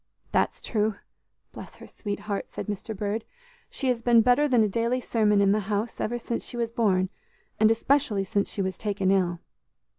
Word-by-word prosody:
"That's - - 0
true, 215 -2 0 0.6
bless - - -10
her - - -12
sweet 205 -2 -5
heart," 205 -2 -3
said - - -6
Mr. 210 0 -5
Bird; 210 +2 -2 0.5
"she 270 - -3
has 240 -2 0
been 235 -1 +5
better 250 +5 +4
than 245 -5 +4
a - - +3
daily 230 +5 0
sermon 210 -4 +2
in 195 -1 +4
the 210 - +3
house 210 +2 -2
ever 240 +2 -1
since 235 0 -4
she 240 - -6
was 230 -1 -1
born, 195 -6 +2 0.5
and 215 0 +6
especially 225 -3 +2
since 200 +1 -1
she 195 - -1
was 190 0 -3
taken 200 -3 0
ill." 180 -3 +1
215 Hz, 190 wpm, -26 LUFS, 200-235 Hz, 0.6 s, and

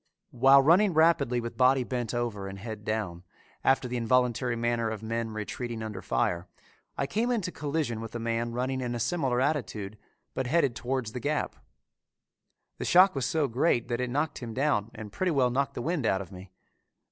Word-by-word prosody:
While 135 +2 +6
running 175 +4 +4
rapidly 155 -6 +3
with 115 0 -6
body 130 0 +4
bent 120 -3 -3
over 115 -5 -3
and 95 0 -7
head 110 +1 -7
down, 105 -6 -3 0.4
after 135 -1 +3
the 125 0 -3
involuntary 125 0 +1
manner 115 -1 0
of 110 -1 -5
men 115 +1 -2
retreating 110 +2 -5
under 105 -4 -5
fire, 85 +1 -1 0.5
I 140 - 0
came 225 - -1
into 210 -7 -1
collision 145 -8 -2
with 115 0 -8
a - - -2
man 115 +1 -1
running 130 +2 -2
in 120 -1 -2
a - - -3
similar 130 0 0
attitude, 110 -8 -2 0.3
but 130 - -2
headed 140 -4 +2
towards 125 -3 -2
the 125 - -5
gap. 145 +5 -1 1.2
The - - -3
shock 185 +2 +6
was 135 -3 -1
so 155 -3 +1
great 120 -1 +1
that 120 +1 -1
it 125 - -1
knocked 145 +4 -1
him 115 -3 -7
down 130 -6 +1
and 110 -2 -8
pretty 185 - 0
well 130 -5 +2
knocked 135 +2 -1
the 120 - -4
wind 155 -6 0
out 95 - +2
of 95 - -16
me. 95 0 -11
120 Hz, 195 wpm, -28 LUFS, 115-140 Hz, 1.2 s, While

